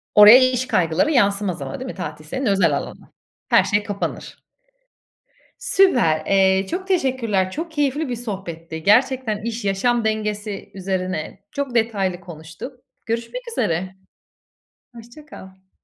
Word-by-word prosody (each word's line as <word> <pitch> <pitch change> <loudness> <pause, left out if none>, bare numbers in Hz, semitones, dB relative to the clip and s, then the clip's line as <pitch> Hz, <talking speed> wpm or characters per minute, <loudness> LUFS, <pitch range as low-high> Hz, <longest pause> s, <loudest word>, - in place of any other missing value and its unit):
Oraya 210 +4 +10
iş 255 0 -2
kaygıları 175 - +1
yansımaz 200 - +1
ama 135 -1 -5
değil 260 0 -5
mi - - -13
tatil 155 -4 -7
senin 260 - -4
özel 190 -9 +3
alanın? - - -9 0.4
Her - - +5
şey 205 +1 0
kapanır. 205 -1 -5 1.2
Süper! 235 - +3
Eee, 190 0 +3
çok 375 - -4
teşekkürler. 250 - 0
Çok 325 - -5
keyifli 295 -1 -1
bir 245 - -2
sohbetti. 170 -8 -7
Gerçekten 245 0 +2
iş, 230 -1 -4
yaşam 225 +4 +1
dengesi 210 -2 -3
üzerine 185 -2 -4
çok 280 -4 -4
detaylı 200 -6 0
konuştuk. 165 - -10 0.3
Görüşmek 230 - -3
üzere. 185 - -1 1.0
Hoşça 235 +6 -13
kal. 190 -8 -14
205 Hz, 130 wpm, -21 LUFS, 185-250 Hz, 1.2 s, Oraya